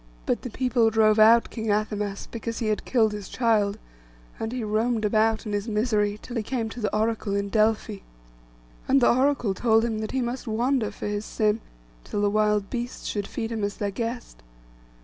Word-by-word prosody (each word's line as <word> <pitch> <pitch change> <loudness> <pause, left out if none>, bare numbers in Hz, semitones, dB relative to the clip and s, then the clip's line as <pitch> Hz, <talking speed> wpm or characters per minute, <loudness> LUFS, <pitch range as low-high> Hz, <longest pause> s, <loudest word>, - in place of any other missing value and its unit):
But - - 0
the 250 - -6
people 245 -1 +2
drove 215 -1 +3
out 230 +2 +6
King 220 -2 -4
Athamas, 210 -1 -1
because 230 0 -5
he 225 -3 -1
had 215 - -1
killed 225 -4 +2
his 210 -2 -7
child; 215 -4 +1 0.6
and 225 - -3
he 250 -2 -3
roamed 220 +1 0
about 220 +2 +2
in 210 - -4
his 205 +2 -2
misery, 210 -2 +1
till 240 +2 -7
he - - +1
came 225 0 -3
to 245 - -8
the 210 - 0
Oracle 220 -2 0
in 200 0 -1
Delphi. 215 0 +1 0.9
And 275 - +5
the 240 - +5
Oracle 255 -5 +2
told 225 +2 +3
him 225 -2 -2
that 215 - -3
he 265 - -1
must 240 +1 -4
wander 235 +1 +1
for - - -8
his 205 0 -2
sin, 215 0 0 0.4
till 205 - -3
the 205 - +2
wild 210 -1 +2
beasts 245 0 -4
should 205 -2 -2
feast 225 -2 -4
him 220 -2 -3
as 205 0 -2
their 205 -1 -2
guest. 235 +4 -5
220 Hz, 200 wpm, -25 LUFS, 210-235 Hz, 0.9 s, out